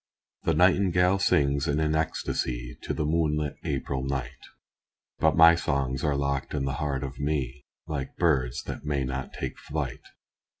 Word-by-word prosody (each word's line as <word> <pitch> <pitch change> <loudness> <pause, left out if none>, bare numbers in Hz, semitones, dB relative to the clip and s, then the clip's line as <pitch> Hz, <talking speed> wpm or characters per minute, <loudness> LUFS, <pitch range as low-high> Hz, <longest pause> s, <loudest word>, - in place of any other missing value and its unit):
The - - +1
nightingale 90 0 +4
sings 70 -6 +2
in 75 +1 +1
an 80 0 +1
ecstasy 60 -6 -2
To - - -4
the 75 - -1
moonlit 75 -2 0
April 65 -2 -2
night, 70 0 -4 0.7
But 80 -2 +3
my 80 +1 +9
songs 70 -5 -1
are 75 -2 +1
locked 70 +1 -1
in 70 -2 -1
the 70 0 -2
heart 70 -2 -1
of 70 0 -6
me, 70 -2 -2 0.2
Like 70 -3 -5
birds 65 -8 +1
that - - -6
may 70 -2 -1
not 65 +1 -4
take - - -5
flight. - - -4
70 Hz, 160 wpm, -27 LUFS, 65-80 Hz, 0.7 s, my